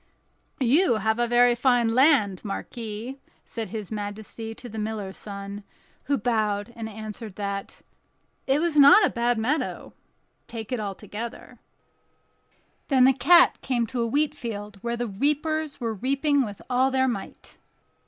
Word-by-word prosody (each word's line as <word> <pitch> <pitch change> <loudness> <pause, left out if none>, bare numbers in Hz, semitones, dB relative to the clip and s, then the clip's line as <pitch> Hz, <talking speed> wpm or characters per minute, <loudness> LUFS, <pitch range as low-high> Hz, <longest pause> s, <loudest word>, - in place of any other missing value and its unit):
"You 275 +4 +4
have 220 +1 0
very 240 0 +4
fine 240 -2 +2
land, 255 - +3
marquis," 225 +4 -6 0.3
said 225 -2 -5
his 215 -3 -6
majesty 220 +2 -6
to 245 - -10
the 220 -1 -7
miller's 210 -3 -4
son, 200 0 -7 0.4
who 280 +1 +1
bowed, 215 -1 -1
and 225 -1 -5
answered 215 -1 -8
that 200 -1 -5 0.6
"it 270 +2 +3
was 330 -2 0
not 285 +9 +8
a - - 0
bad 240 0 0
meadow, 260 +8 -2 0.5
take 225 0 -7
it 250 - -1
altogether." 210 +3 -7 1.3
Then 265 -3 +4
the 265 +1 +6
cat 340 +7 +5
came 245 -3 0
to 240 +2 -3
a 230 - 0
wheat 295 +5 +1
field, 210 -7 -7
where 235 0 -2
the 240 - -2
reapers 300 +7 -1
were 230 -3 -2
reaping 275 +5 +1
with 205 -4 -7
all 255 +1 +2
their 260 0 +2
might. 210 -6 -6
235 Hz, 145 wpm, -25 LUFS, 210-265 Hz, 1.3 s, not